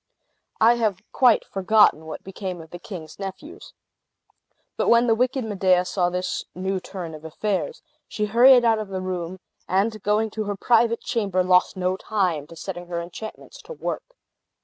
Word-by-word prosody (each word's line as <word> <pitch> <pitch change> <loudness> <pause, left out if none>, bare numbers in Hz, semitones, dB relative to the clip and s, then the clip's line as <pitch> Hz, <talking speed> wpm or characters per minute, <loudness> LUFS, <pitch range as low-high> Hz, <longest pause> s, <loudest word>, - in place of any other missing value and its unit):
I 235 +2 +5
have 215 -4 -1
quite 245 -4 +4
forgotten 195 -5 +3
what 155 - -7
became 185 -1 -6
of 160 -1 -12
the 175 - -8
king's 170 -4 -9
nephews. 195 - -8 1.0
But - - -1
when 235 +1 +5
the 230 - +4
wicked 250 +2 0
Medea 185 -3 +2
saw 180 -1 0
this 180 0 -2
new 190 +1 -2
turn 180 -3 -7
of 155 0 -10
affairs, 205 - -3 0.2
she 210 - -2
hurried 240 +3 +6
out 225 -1 +3
of 215 - -4
the 190 -1 -4
room, 185 -1 -4 0.3
and 210 +3 0
going 210 +2 +1
to 215 0 -3
her 205 0 -2
private 230 +2 +2
chamber, 195 -6 0
lost 180 +1 +3
no 185 0 0
time 180 -10 -1
to 165 - -12
setting 175 +1 -7
her 170 -1 -3
enchantments 180 +6 -9
to - - -9
work. - - -5
195 Hz, 170 wpm, -24 LUFS, 180-220 Hz, 1.0 s, hurried